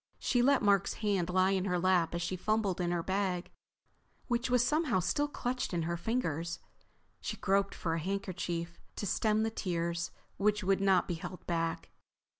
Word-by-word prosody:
She 245 - +1
let 275 0 +4
Mark's 200 -2 +3
hand 190 -4 +1
lie 185 +1 +3
in 190 -1 +1
her 180 -2 +1
lap 175 -2 +2
as 170 - -1
she 185 - -2
fumbled 200 -1 0
in 175 - 0
her 175 -1 0
bag, 190 -2 -1 0.7
which 240 0 0
was 245 -1 +4
somehow 300 - +2
still 290 - +1
clutched 250 -8 -2
in 170 - 0
her 170 +1 -1
fingers. 170 -4 -1 0.6
She - - -4
groped 195 0 +1
for 165 - -2
a 165 - 0
handkerchief 175 -2 -3 0.2
to - - -3
stem 215 +2 +2
the 225 - 0
tears 170 -4 -2 0.3
which 210 0 +2
would 195 +1 +2
not 195 -2 +4
be - - -1
held 175 +2 -7
back. 165 -1 -2
190 Hz, 180 wpm, -32 LUFS, 175-210 Hz, 0.7 s, let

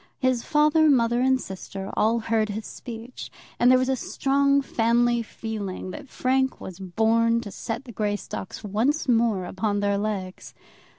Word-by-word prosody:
His 255 -3 +1
father, 305 +1 +4
mother, 240 -3 +3
and 260 0 +3
sister 190 -1 -7
all 225 +2 +3
heard 220 -1 0
his 210 +1 -4
speech, 235 +1 -8 0.3
and 245 - +5
there 255 - +7
was 255 0 +1
a 265 - +2
strong 280 +2 +1
family 235 0 +2
feeling 215 -5 -5
that 275 +7 -9
Frank 265 +1 0
was 185 0 -9
born 225 +5 +2
to 205 -4 -8
set 225 +7 -5
the 240 - -9
Greystocks 205 -1 -4
once 230 +11 0
more 225 -6 +2
upon 205 +3 -1
their 200 0 +1
legs. 200 -3 -4
230 Hz, 160 wpm, -25 LUFS, 205-255 Hz, 0.3 s, there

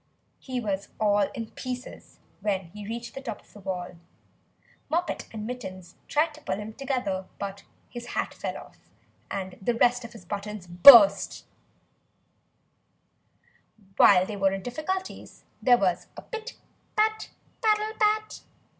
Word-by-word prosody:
He 255 -2 -4
was 200 -4 -3
all 205 -2 +3
in 230 -3 -6
pieces 255 0 -7 0.2
when 190 -5 -2
he 205 +1 -9
reached 235 +2 -6
the 270 - -7
top 265 - -6
of - - -25
the 210 - -12
wall. 180 -2 -5 0.9
Moppet 335 -1 -1
and 215 -1 -6
Mittens 190 -7 -7
tried 305 +1 +1
to 305 - -14
pull 285 - -2
him 210 +2 -7
together; 235 -8 -2 0.6
his 240 0 -8
hat - - -2
fell - - -5
off, - - -14 0.5
and 190 -2 -5
the 235 +5 0
rest 245 +1 +3
of 235 - -9
his 215 -6 -13
buttons 205 0 -5
burst. 200 +3 +8 2.5
While 185 -2 +6
they 205 +1 -6
were 195 -1 +2
in 195 -1 -4
difficulties, 340 +9 -5 0.2
there 245 -2 +6
was 185 -5 0
a - - -8
pit 450 +1 -7 0.4
pat 435 0 +1 0.3
paddle 430 -1 +2
pat! 430 0 +1
225 Hz, 140 wpm, -27 LUFS, 195-275 Hz, 2.5 s, burst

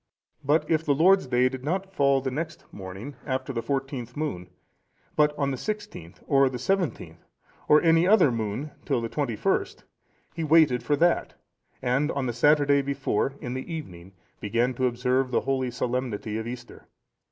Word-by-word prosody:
But 150 +4 +2
if 160 -1 +1
the 145 -3 +2
Lord's 185 +3 +4
day 125 0 +3
did 130 0 -5
not 190 +6 -2
fall 140 -5 +3
the 130 0 -3
next 155 +4 -5
morning 95 +8 -8
after 130 0 -3
the 115 - -2
fourteenth 135 -2 -4
moon, 90 - -4 0.7
but 150 -1 +2
on 140 -1 0
the 130 - -3
sixteenth, 210 - -6
or 135 -2 +4
the 130 - -5
seventeenth, 130 - -2 0.4
or 150 +2 +5
any 165 +1 +4
other 190 - +5
moon 115 +6 -3
till - - 0
the 115 0 -4
twenty 135 -5 -2
first, - - -1 0.5
he 165 - -4
waited 155 -5 +4
for 145 +5 +1
that, 170 +3 +1 0.5
and 135 +4 +1
on 140 -2 -2
the 120 - -2
Saturday 145 +2 +4
before, 135 -2 -1
in 125 - -4
the 130 +6 -6
evening, 95 - -8 0.3
began 120 +5 0
to 130 +1 +1
observe 125 +2 0
the 125 - +1
holy 130 -2 -1
solemnity 120 -3 -3
of 110 - -5
Easter. 120 0 -9
135 Hz, 175 wpm, -26 LUFS, 120-150 Hz, 0.7 s, or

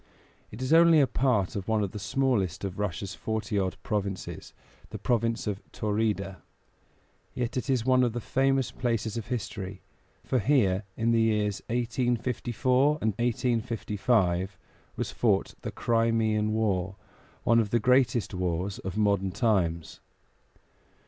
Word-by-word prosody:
It 115 +5 -7
is 130 - +1
only 165 -1 +7
a 140 - +6
part 120 -6 +1
of 100 -2 -4
one 110 -2 +1
of 100 - -3
the 105 - -6
smallest 105 -5 0
of 95 0 -4
Russia's 95 -1 -3
forty 110 -1 -2
odd 95 0 -2
provinces, 100 -3 -4 0.4
the - - -6
province 115 -1 0
of 105 -2 -3
Taurida; 105 -3 -1 1.0
yet 120 +1 -2
it 125 +2 -3
is 125 -4 +1
one 130 -1 +4
of 120 -2 +1
the 120 - -2
famous 135 +2 +1
places 115 -3 -2
of 115 - -4
history, 105 -6 -4 0.4
for 130 - 0
here, 105 -6 +2
in 115 +1 +1
the 115 -1 +3
years 105 -2 +1
1854 125 +3 +1
and 110 -5 0
1855, 110 -5 0 0.4
was - - -3
fought - - +1
the - - -4
Crimean 115 -2 +1
War, 95 -4 0 0.5
one 115 0 +4
of 110 -2 0
the 120 - +2
greatest 125 -1 +2
wars 90 +1 -2
of 95 +2 -5
modern 100 -2 +2
times. 90 - 0
110 Hz, 140 wpm, -28 LUFS, 100-120 Hz, 1.0 s, only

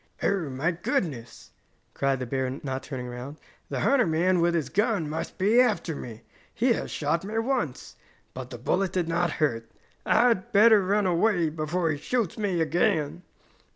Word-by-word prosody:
"Oh, 190 -7 0
my 135 +6 -1
goodness!" 155 -7 -3 0.4
cried 135 -1 0
the - - -2
bear, 130 +1 -2
not 135 -1 -3
turning 130 -4 -6
around. 125 +4 -7 0.3
"The - - -3
hunter 265 -7 +3
man 175 +3 +2
with 170 0 +2
his 155 -6 -1
gun 205 -5 0
must 155 +2 -5
be 210 +6 +3
after 210 -9 0
me. 115 -4 -9 0.3
He 235 +1 +3
has - - -4
shot 155 +3 -1
me 215 +3 -4
once, 225 - -2 0.4
but 130 -1 -7
the 120 - -7
bullet 185 +10 0
did 180 -3 0
not 170 0 0
hurt. 115 -7 -1 0.3
I 245 - +4
had 230 +1 -1
better 215 0 +6
run 200 +2 +1
away 175 -1 +2
before 160 +2 -1
he 145 - -2
shoots 230 - -1
me 195 -6 -1
again!" 160 -1 0
170 Hz, 175 wpm, -26 LUFS, 140-205 Hz, 0.4 s, better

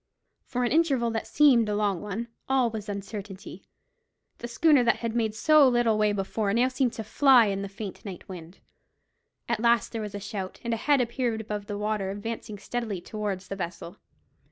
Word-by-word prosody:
For 250 -1 -2
an 240 - 0
interval 275 -7 +2
that 225 -1 -3
seemed 250 -7 +4
a 210 - 0
long 205 -4 0
one, 210 +3 -5 0.2
all 260 -3 +2
was 215 -1 -6
uncertainty. 200 -1 -7 0.7
The 240 - -5
schooner 290 +2 +4
that 240 - +3
had 230 -1 -4
made 220 -2 0
so 305 +4 +5
little 240 -2 +2
way 210 0 +2
before 205 +1 -1 0.2
seemed 255 -1 0
now - - -10
to 220 - -5
fly 255 +1 +5
in 195 -1 -1
the 200 - -5
faint 200 -1 -8
night 190 -4 -8
wind. 175 -1 -10 0.9
At 235 -2 0
last 235 -1 +2
there 225 - -4
was 210 -1 -6
a - - -4
shout, 195 -1 -6
and 235 -1 -1
a - - 0
head 285 +3 +3
appeared 235 -1 -1
above 210 -2 -5
the 205 -1 -4
water 210 -2 -1
advancing 215 +1 -5
steadily 220 -2 -4
towards 195 -1 -4
the 195 - -5
vessel. 175 -2 -6
220 Hz, 195 wpm, -27 LUFS, 200-240 Hz, 0.9 s, so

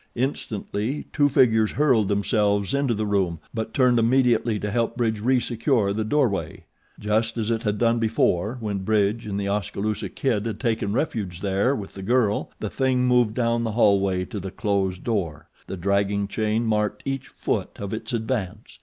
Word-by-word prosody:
Instantly 120 -1 -3
two 145 -1 +3
figures 110 -5 +3
hurled 130 -8 +3
themselves 100 -1 +1
into 140 -4 +1
the 110 +1 -1
room 95 -5 0
but 110 -1 -3
turned 125 -2 +3
immediately 120 -2 +2
to 105 0 -3
help 115 +1 -1
Bridge 110 -3 0
resecure 120 -3 +1
the 110 +1 -1
doorway. 120 -3 0 0.4
Just 110 +2 0
as 110 0 -1
it 115 -1 0
had 105 -3 -1
done 115 +1 +2
before, 110 -1 +1
when 105 -3 -2
Bridge 105 +2 0
and 100 -1 -2
The 100 - -2
Oskaloosa 105 +1 -2
Kid 115 -5 -1
had 110 -2 -4
taken 110 -3 -1
refuge 100 - -2
there 100 +7 +1
with 100 -6 -7
the 95 - -8
girl, 110 0 +1
the 105 - -4
THING 130 -2 +1
moved 125 -3 +3
down 115 -1 +1
the 110 -2 -2
hallway 100 -4 +3
to 105 - -6
the 95 +1 -5
closed 95 -2 -1
door. 95 -10 -2 0.2
The 95 - -5
dragging 100 +2 0
chain 110 +2 -1
marked 105 -1 0
each 135 -1 -3
foot - - -2
of 100 0 -5
its 110 - -5
advance. 110 -3 -3
110 Hz, 175 wpm, -24 LUFS, 100-120 Hz, 0.4 s, two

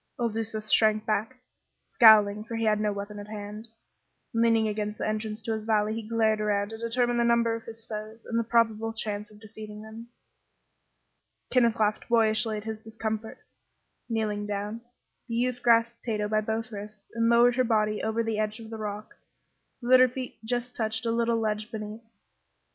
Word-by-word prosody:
Il 235 -1 +1
Duca 220 0 -3
shrank 215 0 +3
back, 220 +4 -1 0.5
scowling, 210 -3 +6
for 230 +1 -6
he 225 - -1
had 215 -1 +3
no 210 -1 +1
weapon 205 +1 -6
at 205 - -8
hand. 210 +1 -7 0.7
Leaning 230 -1 +3
against 210 0 -3
the - - -2
entrance 215 0 -3
to 225 - -1
his 220 -1 -4
valley 215 -1 +2
he 225 - -3
glared 220 -2 +2
around 205 -1 0
to 225 - -7
determine 240 +1 0
the 235 - +3
number 235 -1 +3
of 225 0 -6
his 225 0 -9
foes 215 +1 -7
and 230 -1 -1
the - - +1
probable 225 -1 +1
chance 210 -1 -4
of 210 -1 -17
defeating 215 -1 -10
them. 220 +2 -10 1.4
Kenneth 235 -3 +4
laughed 215 +1 0
boyishly 220 -1 +2
at 210 - -6
his 220 -1 -5
discomfiture. 220 0 -5 0.6
Kneeling 210 -2 -1
down, 210 +2 -4 0.5
the 230 - -3
youth 245 +1 0
grasped 235 0 +3
Tato 210 -3 -1
by 215 0 +1
both 225 +2 -3
wrists 210 0 -9
and 230 0 +2
lowered 240 +1 +5
her 255 - +3
body 215 -3 +1
over 220 +1 0
the 225 -1 -2
edge 215 +1 -1
of 225 -1 -10
the 225 - -5
rock 210 0 -5 0.7
so 240 - -6
that 255 0 +8
her 255 0 +6
feet 255 -2 -7
just 245 +2 -2
touched 220 0 -1
a 230 - +1
little 230 0 +1
ledge 215 0 -2
beneath. 215 0 -6
220 Hz, 185 wpm, -27 LUFS, 215-230 Hz, 1.4 s, that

